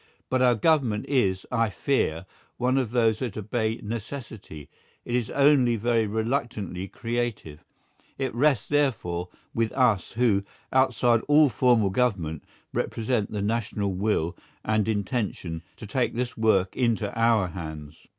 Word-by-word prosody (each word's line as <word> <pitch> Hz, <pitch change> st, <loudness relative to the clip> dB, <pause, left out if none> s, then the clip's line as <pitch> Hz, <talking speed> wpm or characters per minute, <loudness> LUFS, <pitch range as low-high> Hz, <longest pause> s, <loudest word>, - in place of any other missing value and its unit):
But 130 Hz, 0 st, +2 dB
our 125 Hz, -1 st, +5 dB
Government 120 Hz, -3 st, +2 dB
is, 100 Hz, -9 st, +1 dB
I 115 Hz, -3 st, +2 dB
fear, 95 Hz, -, -1 dB, 0.3 s
one 130 Hz, +2 st, +2 dB
of 125 Hz, -4 st, -1 dB
those 115 Hz, -2 st, +2 dB
that 120 Hz, -6 st, -4 dB
obey 110 Hz, +1 st, -1 dB
necessity; 110 Hz, -, -7 dB, 0.4 s
it 120 Hz, -, -4 dB
is 120 Hz, -2 st, 0 dB
only 140 Hz, -4 st, +4 dB
very 115 Hz, 0 st, +1 dB
reluctantly 110 Hz, -4 st, -2 dB
creative; 115 Hz, -10 st, -4 dB, 0.5 s
it 135 Hz, -1 st, -2 dB
rests, 135 Hz, -1 st, +2 dB
therefore, 110 Hz, -12 st, 0 dB, 0.2 s
with 115 Hz, -1 st, 0 dB
us 115 Hz, -9 st, +2 dB
who, 110 Hz, -4 st, +2 dB, 0.3 s
outside 125 Hz, -3 st, +3 dB
all 150 Hz, 0 st, +6 dB
formal 115 Hz, -2 st, +3 dB
government, 95 Hz, -, 0 dB, 0.3 s
represent 115 Hz, -2 st, -1 dB
the 105 Hz, -2 st, -2 dB
national 105 Hz, -2 st, -1 dB
will 95 Hz, -3 st, 0 dB, 0.3 s
and 110 Hz, -1 st, +1 dB
intention, 100 Hz, -6 st, -2 dB, 0.2 s
to -, -, -9 dB
take 120 Hz, +4 st, -1 dB
this 125 Hz, +1 st, -2 dB
work 100 Hz, -4 st, +2 dB
into 115 Hz, -4 st, 0 dB
our 115 Hz, -5 st, +2 dB
hands. 80 Hz, -3 st, -8 dB
115 Hz, 135 wpm, -26 LUFS, 100-125 Hz, 0.5 s, all